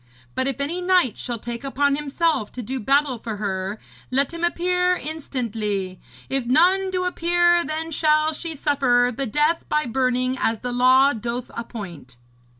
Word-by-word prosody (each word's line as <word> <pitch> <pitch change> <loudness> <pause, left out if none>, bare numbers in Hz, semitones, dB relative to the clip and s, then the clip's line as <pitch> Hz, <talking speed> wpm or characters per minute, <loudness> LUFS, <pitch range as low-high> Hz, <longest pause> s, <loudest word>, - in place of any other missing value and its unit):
But 260 0 -1
if 275 -2 -2
any 320 +6 -2
knight 360 - +3
shall 240 -1 -3
take 235 +2 -6
upon 280 +1 +1
himself 295 -4 -1
to 250 - -6
do 260 +5 -3
battle 275 +1 +1
for 220 -2 -5
her, 195 0 -3 0.3
let 275 +5 +1
him 335 0 -6
appear 360 +1 +2
instantly. 225 - -3 0.3
If 265 -3 -2
none 365 +8 +4
do 365 -1 -1
appear, 345 0 +3
then 320 +1 -4
shall 305 0 +2
she 325 +1 -5
suffer 250 -4 +2
the 270 +1 -2
death 300 +8 +1
by 300 0 +1
burning 255 +1 0
as 225 -1 0
the 245 - -3
law 260 +3 +5
doth 235 +2 -4
appoint.' 175 - -8
270 Hz, 160 wpm, -23 LUFS, 235-320 Hz, 0.3 s, law